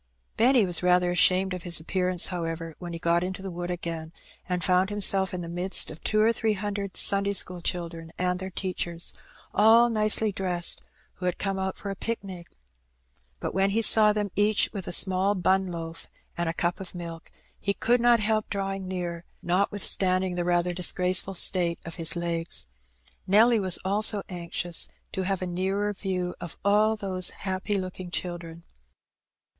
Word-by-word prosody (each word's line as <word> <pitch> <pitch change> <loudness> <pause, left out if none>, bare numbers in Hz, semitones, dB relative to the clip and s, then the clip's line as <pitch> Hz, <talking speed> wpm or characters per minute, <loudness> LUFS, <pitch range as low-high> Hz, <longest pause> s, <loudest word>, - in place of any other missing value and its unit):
Benny 245 -1 +4
was 175 -2 +1
rather 180 0 +3
ashamed 185 +1 +3
of 180 - -5
his 170 -2 0
appearance, 180 +2 +1
however, 165 -2 -4
when 175 -1 -7
he 170 - -5
got 170 +1 +1
into 190 +1 -5
the 190 - -5
wood 175 0 -5
again, 165 -2 -5 0.4
and 180 -1 -1
found 185 +3 +3
himself 195 -2 +3
in 180 - -4
the 170 - -6
midst 175 +2 +1
of 155 - -12
two 215 - +1
or 220 +2 +4
three 220 -1 0
hundred 200 -1 -4
Sunday 200 0 +3
school 180 -2 +2
children 170 -2 -4
and 180 0 -1
their 190 0 -5
teachers, 175 -2 -2 0.4
all 230 +3 +5
nicely 215 0 +2
dressed, 180 -3 0 0.4
who 180 - -3
had 180 - -1
come 195 -1 -2
out 190 0 -3
for 200 - -5
a - - -5
picnic. 190 -5 -5 0.9
But - - -4
when 195 +1 +2
he 225 +3 +2
saw 215 -1 +6
them 210 -2 -2
each 205 +1 +2
with 195 -4 -6
a - - -3
small 190 +2 +3
bun 190 +1 +1
loaf 165 -2 -7 0.3
and 170 -1 -1
a - - -2
cup 175 +1 -1
of 190 -2 -9
milk, 165 -2 -8 0.3
he 200 0 -1
could 240 +1 +2
not 240 -1 +5
help 215 0 0
drawing 195 -1 -3
near, 175 -2 -4 0.2
notwith 195 +3 0
standing 185 -1 +2
the 175 0 -2
rather 175 0 +1
disgraceful 185 +1 +2
state 170 -1 +1
of 170 - -7
his 165 0 +3
legs. 170 - -3 0.6
Nelly 220 +4 +5
was 185 -3 +2
also 205 +1 +2
anxious 175 -1 -1 0.2
to 190 - -3
have 195 -1 -1
a - - -1
nearer 190 +3 -1
view 185 -3 -3
of 175 - -7
all 210 +2 +3
those 190 -4 -1 0.2
happy 190 +2 -1
looking 185 -1 -6
children. 170 -2 -6
185 Hz, 180 wpm, -26 LUFS, 175-200 Hz, 0.9 s, saw